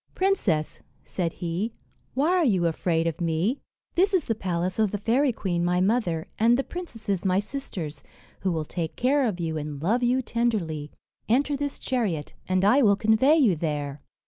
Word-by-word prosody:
"Princess," 220 - +1 0.3
said 175 -3 -2
he, 180 +6 -3 0.4
"why 285 +5 +2
are 365 -1 +3
you 190 - +2
afraid 165 0 0
of 165 0 -2
me? 170 - 0 0.3
This 385 +3 +3
is 350 - +1
the 225 - 0
palace 180 -2 -2
of 215 -2 +3
the 205 - -2
fairy 245 +7 +2
queen 180 -6 -2
my 180 +1 +2
mother, 185 -5 +1
and 235 +2 +5
the 270 - 0
princesses 225 - -4
my 185 -1 +2
sisters, 195 - -4 0.4
who 190 - 0
will 160 -2 -2
take 165 0 -4
care 270 +1 +2
of 190 -5 -3
you, 160 -2 -2
and 150 -1 -5
love 210 - +1
you 250 +2 +2
tenderly. 195 -12 -1 0.4
Enter 280 +5 +2
this 285 0 -3
chariot, 205 - -2 0.2
and 185 +1 +2
I 255 +8 +5
will 205 -5 +5
convey 220 +8 +4
you 250 - +4
there." 150 -3 -3
200 Hz, 180 wpm, -26 LUFS, 170-250 Hz, 0.4 s, and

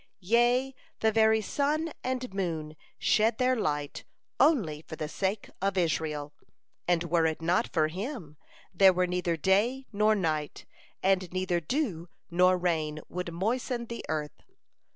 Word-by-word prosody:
Yea, 245 +3 +3 0.3
the 220 - +3
very 220 0 +4
sun 300 +8 -1
and 255 -3 -3
moon 160 -5 -3 0.2
shed 220 +1 +2
their 255 0 +2
light 150 - -2 0.4
only 175 - +3
for 160 - -9
the 155 - -4
sake 195 +5 -2
of 195 0 0
Israel, 150 -4 -1 0.5
and 175 -1 +2
were 170 -1 +2
it 160 - -2
not 170 +2 +1
for 155 -3 +2
him, 185 - -6 0.4
there 190 +1 +6
were 180 0 +2
neither 180 -2 -1
day 210 - +2
nor 215 +1 +3
night, 155 -6 -2 0.4
and 190 -2 +2
neither 185 -1 0
dew 175 - -2 0.2
nor 180 +1 +4
rain 160 -4 -1
would 180 -1 -4
moisten 235 +7 -2
the 235 0 -7
earth. 150 -1 -3
185 Hz, 145 wpm, -29 LUFS, 160-225 Hz, 0.5 s, there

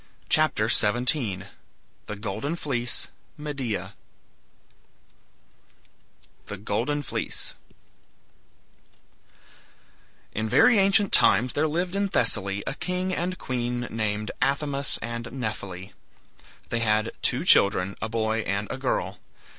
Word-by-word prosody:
CHAPTER - - +3
XVII 115 -3 +2 0.6
THE 105 - -4
GOLDEN 110 +9 -3
FLEECE 125 -7 -2 0.3
MEDEA 140 -7 -4 2.5
THE 100 - -6
GOLDEN 120 +9 -1
FLEECE - - -4 2.8
In 110 +1 -2
very 235 - +6
ancient 195 +1 +4
times 125 +2 +5
there 155 +2 +1
lived 175 +4 -1
in 200 0 +1
Thessaly 100 - +1
a - - -2
king 180 +4 -2
and 185 +2 -2
queen 120 -3 -2
named 110 -1 -1
Athamas 140 0 +1
and 115 0 -4
Nephele. 100 -6 -5 0.8
They 120 - 0
had 110 0 +2
two - - 0
children, 100 -1 +4
a 110 - -2
boy 110 0 0
and 100 -1 -2
a - - -4
girl. - - -1
120 Hz, 105 wpm, -26 LUFS, 105-150 Hz, 2.8 s, very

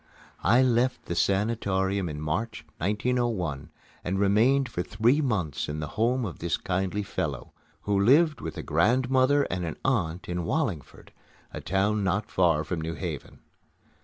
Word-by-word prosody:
I 120 +8 +5
left 125 0 +1
the - - -3
sanatorium 95 -1 0
in 75 -1 -5
March, 80 +3 -3
1901, 105 - -1 0.3
and 95 +2 -1
remained 115 +8 +3
for 100 -6 -3
three 120 +10 +2
months 100 - -1
in 75 +1 -3
the 75 - -4
home 120 +3 0
of 90 - -6
this 85 - -1
kindly 95 +2 -2
fellow, 75 -9 -4 0.3
who 100 -1 0
lived 150 +7 +4
with - - -6
a - - -4
grandmother 130 - +3
and 90 +1 -2
an 80 -2 -4
aunt 90 -10 0
in 90 0 -2
Wallingford, 95 - -3 0.4
a - - -6
town 100 +2 0
not 105 +3 -1
far 85 -4 +3
from 80 +2 -3
New 80 +1 -4
Haven. - - -6
100 Hz, 155 wpm, -27 LUFS, 85-120 Hz, 0.4 s, I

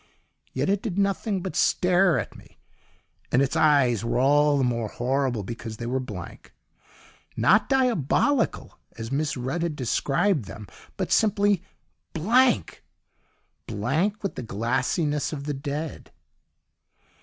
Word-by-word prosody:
Yet - - -1
it 200 0 +1
did 200 -5 -4
nothing 200 -1 0
but 190 - -5
stare 180 -3 +3
at 110 - -4
me, - - -17 0.7
and 125 - +3
its 140 +3 +1
eyes 140 -8 +3
were 115 - -1
all 145 +3 +4
the 135 - +1
more 120 -3 0
horrible 125 -1 -1
because 115 +1 -7
they 115 - -6
were 130 +2 -1
blank; 105 -9 -9 0.8
not 210 +6 +4
diabolical, 255 - +1 0.2
as 115 +1 -6
Miss 145 0 -1
Rudd 130 +7 -3
had 170 -3 -2
described 135 - 0
them, 105 +2 -9 0.3
but - - -3
simply 205 -3 +3 0.5
Blank! 210 - +2 0.8
Blank 160 - -1
with 195 - -2
the - - -6
glassiness 130 - -1
of 140 -2 -5
the 145 0 -3
Dead. 145 +2 -5
145 Hz, 130 wpm, -25 LUFS, 125-190 Hz, 0.8 s, all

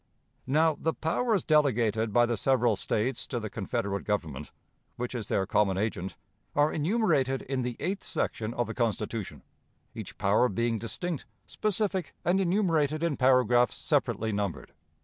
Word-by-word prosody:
"Now, 155 +3 +3
the 160 - 0
powers 205 +5 0
delegated 115 -8 +2
by 120 +3 +5
the 120 0 0
several 120 -1 +2
States 115 +6 -1
to 120 - -2
the 110 -2 -6
Confederate 100 -1 -2
Government, 80 -10 -3 0.4
which 125 +1 -4
is 115 -4 -4
their 95 - +1
common 100 -1 +2
agent, 95 -3 -2 0.4
are 145 +1 +3
enumerated 155 - +1
in 135 -1 -2
the 125 -1 -3
eighth 190 +6 -2
section 110 0 -2
of 120 - 0
the 115 - -5
Constitution; 110 -3 -2 0.5
each - - -8
power 105 +6 +3
being 115 +2 0
distinct, 155 - -4 0.2
specific, 200 -4 -1
and 185 +3 +3
enumerated 165 -5 +1
in 165 -4 +1
paragraphs 125 -2 +4
separately 110 0 0
numbered. 100 -3 -3
125 Hz, 150 wpm, -29 LUFS, 110-155 Hz, 0.5 s, by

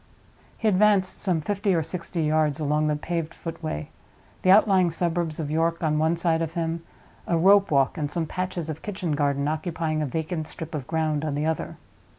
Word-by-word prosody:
He 225 - -1
advanced 200 -1 +3
some 180 -5 0
fifty 200 +3 0
or 165 - +1
sixty 170 +1 -4
yards 155 -1 +1
along 150 0 +1
the 150 - +1
paved 165 +1 -3
footway; 160 - -5 0.5
the 185 - +1
outlying 190 -2 +6
suburbs 170 -1 -1
of 150 -2 -3
York 165 +2 0
on 155 -1 +1
one 160 +2 +2
side 165 -1 +1
of 165 0 -3
him, 165 0 -2 0.5
a 170 - +2
rope 200 +4 +5
walk 140 0 +2
and 145 -1 -1
some 165 +2 -1
patches 180 0 -3
of 155 0 -5
kitchen 185 -5 -3
garden 140 -1 +1
occupying 155 0 -2
a 150 - -1
vacant 160 +2 -3
strip 160 0 -8
of 140 -4 -4
ground 155 -2 0
on 150 -2 -2
the 150 +1 -1
other. 160 -1 -2
160 Hz, 190 wpm, -25 LUFS, 155-175 Hz, 0.5 s, outlying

